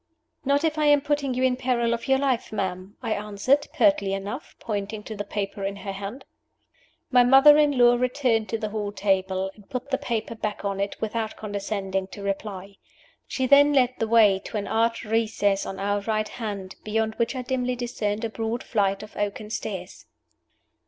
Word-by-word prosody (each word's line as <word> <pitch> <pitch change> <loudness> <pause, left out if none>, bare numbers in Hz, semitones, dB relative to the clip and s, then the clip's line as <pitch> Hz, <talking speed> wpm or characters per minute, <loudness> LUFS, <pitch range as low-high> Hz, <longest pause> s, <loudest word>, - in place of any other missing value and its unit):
"Not 280 +2 +2
if 315 -1 0
I 305 - +2
am 290 -1 +5
putting 280 -3 -1
you 255 - 0
in 255 -1 +3
peril 245 -2 +1
of 235 +3 -4
your 265 0 +4
life, 265 -3 0
ma'am," 190 -1 -4
I 220 - 0
answered, 210 +8 +1
pertly 290 -11 +3
enough, 200 +8 -5
pointing 210 -1 -4
to 220 - -7
the 205 - -3
paper 200 -1 -4
in 195 0 -2
her 200 0 -6
hand. 200 +7 -7 0.9
My 250 -1 +6
mother 270 +4 +8
in 290 -2 +3
law 240 0 +6
returned 250 -3 +1
to 225 - -1
the 215 -1 -3
hall 210 -1 -3
table, 190 -1 0
and 205 -2 -19
put 255 +2 -5
the 265 - +1
paper 230 -5 -2
back 215 -2 -4
on 200 -1 -2
it 200 0 -2
without 220 0 -2
condescending 200 -2 -3
to 200 +1 -10
reply. 195 -1 -4 0.5
She 260 - -1
then 285 +2 +6
led 255 -2 +3
the 225 - 0
way 215 -4 +5
to - - -4
an 205 - -2
arched 230 +1 +1
recess 215 -3 +1
on 195 - -5
our 205 +1 0
right 215 +1 -1
hand, 200 -5 -6
beyond 220 +1 0
which 235 +3 0
I 255 - -3
dimly 250 -1 -1
discerned 230 -3 -2
a - - -2
broad 225 +1 -3
flight 200 -3 0
of 215 - -12
oaken 205 +1 -3
stairs. 190 -4 -6
220 Hz, 195 wpm, -25 LUFS, 200-250 Hz, 0.9 s, mother